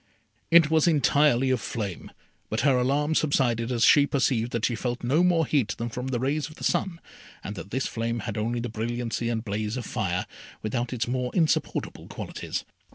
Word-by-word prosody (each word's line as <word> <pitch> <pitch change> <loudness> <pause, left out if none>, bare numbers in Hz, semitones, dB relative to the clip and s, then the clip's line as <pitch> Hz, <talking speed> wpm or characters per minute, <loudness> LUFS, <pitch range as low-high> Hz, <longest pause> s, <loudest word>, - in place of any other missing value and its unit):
It 165 -2 +6
was 160 +1 +4
entirely 145 -4 +3
of 130 - +1
flame; 100 -7 -5 0.4
but 110 - -1
her 140 0 +4
alarm 140 +5 +1
subsided 125 -6 +1
as 120 -2 +3
she 145 -1 +6
perceived 125 -4 +1
that 115 -1 0
she 120 - 0
felt 120 +2 -3
no 145 +8 +3
more 170 -3 +3
heat 125 -10 +1
than 120 +1 -3
from 125 +2 -5
the 130 -2 -1
rays 145 +5 -1
of 155 - -13
the - - -11
sun, 175 -3 0 0.4
and 105 - -5
that 95 - -8
this 130 +4 -1
flame 115 0 -2
had 110 -4 -4
only 115 +2 -1
the 120 - -3
brilliancy 115 +1 -3
and 115 -1 -2
blaze 105 +2 -2
of 125 - -4
fire, 95 -6 -2 0.4
without 120 +3 -2
its 120 -2 -2
more 125 0 -1
insupportable 160 -4 0
qualities. - - -5
120 Hz, 195 wpm, -26 LUFS, 115-140 Hz, 0.4 s, It